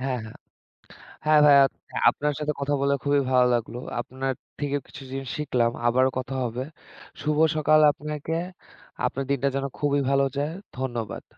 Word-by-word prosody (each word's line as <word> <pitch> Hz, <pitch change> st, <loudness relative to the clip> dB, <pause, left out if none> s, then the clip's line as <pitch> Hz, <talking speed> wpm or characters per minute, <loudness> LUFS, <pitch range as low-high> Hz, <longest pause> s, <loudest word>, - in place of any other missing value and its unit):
হ্যাঁ, 130 Hz, -1 st, -1 dB
হ্যাঁ। 110 Hz, -, -11 dB, 0.9 s
হ্যাঁ, 155 Hz, -1 st, +5 dB
ভাইয়া 140 Hz, -1 st, +8 dB
হচ্ছে -, -, -15 dB, 0.2 s
আপনার 150 Hz, 0 st, -2 dB
সাথে 150 Hz, 0 st, -1 dB
কথা 145 Hz, +1 st, 0 dB
বলে 140 Hz, 0 st, +2 dB
খুবই 145 Hz, 0 st, +3 dB
ভালো 125 Hz, -1 st, +5 dB
লাগলো। 120 Hz, +1 st, -2 dB, 0.2 s
আপনার 130 Hz, +2 st, -3 dB, 0.3 s
থেকেও 145 Hz, -1 st, -1 dB
কিছু 135 Hz, -, -11 dB
জিনিস 135 Hz, -1 st, -5 dB
শিখলাম। 125 Hz, -6 st, +1 dB, 0.2 s
আবারো 130 Hz, +2 st, +3 dB
কথা 130 Hz, +1 st, -4 dB
হবে। 120 Hz, +2 st, -3 dB, 0.6 s
শুভ 150 Hz, 0 st, 0 dB, 0.2 s
সকাল 155 Hz, 0 st, +4 dB
আপনাকে। 150 Hz, +2 st, -4 dB, 0.7 s
আপনার 135 Hz, +1 st, -2 dB
দিনটা 140 Hz, 0 st, +1 dB
যেন 135 Hz, 0 st, -1 dB
খুবই 145 Hz, -1 st, +1 dB
ভালো 140 Hz, 0 st, +3 dB
যায়। 145 Hz, +3 st, -1 dB, 0.3 s
ধন্যবাদ। 120 Hz, -5 st, -4 dB
140 Hz, 160 wpm, -25 LUFS, 130-145 Hz, 0.9 s, ভাইয়া